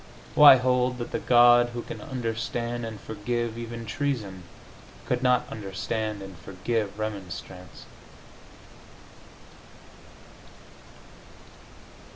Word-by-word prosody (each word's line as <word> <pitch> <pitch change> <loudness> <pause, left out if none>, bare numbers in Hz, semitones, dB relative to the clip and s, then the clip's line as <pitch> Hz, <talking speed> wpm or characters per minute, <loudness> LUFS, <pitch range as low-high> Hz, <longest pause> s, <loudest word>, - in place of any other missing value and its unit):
Why 145 -2 +10
hold 125 0 +1
that 120 - -6
the - - -2
God 120 0 +6
who 120 - -4
can - - -8
understand 120 -3 -3
and 110 -2 -8
forgive 115 +2 -3
even 115 0 -7
treason 110 -7 -3 0.6
could - - -1
not 125 -1 +3
understand 105 +1 -4
and 95 -1 -10
forgive 100 +3 -3
remonstrance? 95 -4 -7
115 Hz, 90 wpm, -26 LUFS, 105-120 Hz, 0.6 s, Why